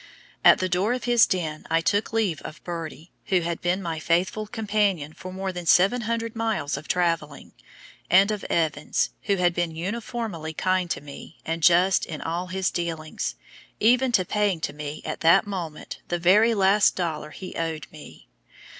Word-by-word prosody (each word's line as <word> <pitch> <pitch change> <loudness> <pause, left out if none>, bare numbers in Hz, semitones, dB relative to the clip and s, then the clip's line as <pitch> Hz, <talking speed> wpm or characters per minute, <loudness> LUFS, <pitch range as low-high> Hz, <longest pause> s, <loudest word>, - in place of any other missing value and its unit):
At - - +8
the 185 - -1
door 185 +6 +1
of 250 -1 -4
his 240 -2 +5
den 160 -4 -3
I 165 0 +3
took 205 +5 0
leave 210 -9 0
of 155 - -10
Birdie, 165 -1 -7
who 185 -2 +2
had 170 0 -3
been 180 +2 0
my 165 -2 -3
faithful 175 +6 0
companion 205 -8 -1
for 185 +2 -9
more 190 +1 -3
than 175 -1 -6
700 230 +5 +2
miles 220 -11 -1
of 145 +2 -8
traveling, 165 -5 -1 0.6
and 195 +4 +5
of 210 -2 -4
Evans, 155 -3 0
who 200 - +2
had 175 -2 +2
been 170 -2 -2
uniformly 200 -3 -4
kind 185 0 0
to - - -2
me 145 +2 -11
and 165 +1 -3
just 175 +3 +4
in 155 - -6
all 170 +3 -3
his 190 0 -1
dealings, 165 -3 -3 0.4
even 250 +3 +4
to 185 -5 +3
paying 205 -3 0
to - - -3
me 150 0 -7
at - - -4
that 165 +5 +5
moment 175 -6 -6
the 175 - -1
very 210 +7 +4
last 200 +1 +4
dollar 160 -4 -3
he 185 +4 -9
owed 160 -3 -3
me. - - -13
180 Hz, 175 wpm, -25 LUFS, 165-205 Hz, 0.6 s, At